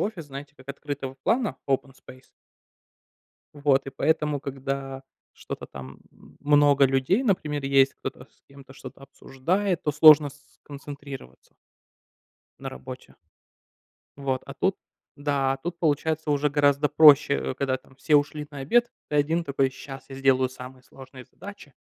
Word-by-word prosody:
офис, 195 -6 -3
знаете, 140 +1 -9
как 130 +1 -18
открытого 140 -1 -6
плана- 230 -2 0
open 135 0 0
space. 130 0 -16 1.3
Вот, 140 -2 +1
и - - -5
поэтому, 150 +1 0
когда 135 -1 -5 0.3
что-то - - -8
там, 65 0 -11
м, - - -20
много 145 -1 +4
людей, 135 - +2
например, 155 - -1
есть, 135 0 +3
кто-то 125 -1 -7
с - - -35
кем-то 140 -1 -15
что-то 135 - -12
обсуждает, 170 +8 -2
то 150 - -1
сложно 150 0 +7
с - - -15 0.3
сконцентрироваться 140 - -10 1.1
на - - -6
работе. 65 0 -10 1.0
Вот, 135 -2 -2
а 140 - -7
тут 190 +7 0 0.4
Да, 140 -2 0
а - - -3
тут, 170 +5 -6
получается, 160 0 0
уже 145 0 +2
гораздо 145 0 +2
проще, 150 -1 +6
э, - - -3
когда 135 0 -1
там 130 - -22
все 150 +3 0
ушли 150 +1 +1
на 140 - -8
обед, 240 - +2 0.2
ты 150 - -1
один 160 +4 +1
такой: 140 -3 0
"Щас 135 +1 -10
я - - -7
сделаю 135 -1 +2
самые 130 0 -12
сложные 130 -1 -13
задачи". 200 -4 -12
140 Hz, 150 wpm, -25 LUFS, 135-150 Hz, 1.3 s, сложно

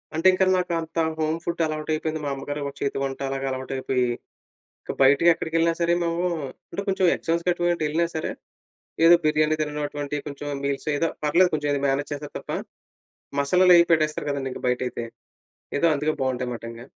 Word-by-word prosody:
అంటే 165 +4 +3
ఇంకా 190 +1 +3
నాకు 180 -1 -1
అంత 160 +1 -9 0.2
హోమ్ 155 +1 0
ఫుడ్ 170 0 -2
అలవాటు 155 0 -3
అయిపోయింది. 155 0 -2
మా 145 - -1
అమ్మగారు 145 +2 -5
ఒక 140 - -6
చేతి 140 - -1
వంట 135 0 -3
అలాగా 135 0 -3
అలవాటు 130 0 -4
అయిపోయి, 130 -1 0 0.8
ఇక - - -4
బయటకెక్కడికెళ్ళినా 165 +3 +4
సరే, 170 0 +3
మేము 170 +1 -1 0.5
అంటే 200 - -4
కొంచెం 190 -1 +2
ఎగ్జామ్స్ 170 +1 -1
గటువంటి 175 -2 +1
ఎళ్ళినా 165 +3 +1
సరే, 155 - -2 0.8
ఏదో 175 +1 +9
బిర్యానీ 155 0 +3
తిననటువంటి 150 -1 -3
కొంచెం 145 0 -6 0.2
మీల్స్, 140 +2 -2
ఏదో 165 - +1 0.2
పర్లేదు 175 +5 +4
కొంచెం 145 -2 0
మేనేజ్ 140 +2 -1
చేస్తారు 145 0 -7
తప్ప, - - -8 0.9
మసాలాలు 180 +6 +5
అవి 170 - +6
పెట్టేస్తారు 155 -2 +1
కదండీ 140 -2 -2
ఇంక - - -8
బయటైతే. 125 -1 -1 0.7
ఏదో 170 - +4
అందుకే 150 +2 0
బావుంటాయి 125 -1 -1
మాట 115 - -8
ఇంకా. 115 +2 -10
155 Hz, 170 wpm, -24 LUFS, 140-170 Hz, 0.9 s, ఏదో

